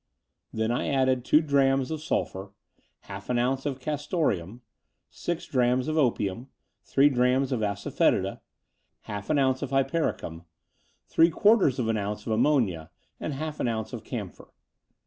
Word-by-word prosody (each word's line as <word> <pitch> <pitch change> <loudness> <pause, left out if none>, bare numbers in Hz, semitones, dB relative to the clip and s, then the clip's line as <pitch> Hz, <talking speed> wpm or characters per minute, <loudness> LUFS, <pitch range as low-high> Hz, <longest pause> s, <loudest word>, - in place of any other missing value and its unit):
Then 110 +1 -1
I 120 - -1
added 130 -2 +2
two 150 +4 +4
drachms 135 -2 +2
of 155 -1 -3
sulphur, 95 -9 -3 0.5
half 100 +2 -9
an 125 - +1
otmce 130 +3 0
of 135 -2 -3
castoreum, 130 - -2 0.5
six 175 -1 -4
drachms 125 0 +1
of 155 - -1
opium, 120 -5 0 0.4
three 140 +1 +4
drachms 130 0 +2
of 125 - 0
asafoetida, 100 -2 0 0.6
half 100 -1 -7
an 155 - +2
otmce 130 -1 +2
of 140 - -3
hypericum, 135 - -1 0.6
three 165 +1 +4
quarters 200 - +4
of 120 -4 -1
an 115 -1 +1
otmce 105 +1 -4
of 110 - -1
ammonia, 110 - +1 0.3
and 155 - -3
half 155 +1 -5
an - - 0
ounce 110 -1 -3
of 115 -3 -6
camphor. 105 -8 -7
130 Hz, 150 wpm, -27 LUFS, 110-140 Hz, 0.6 s, two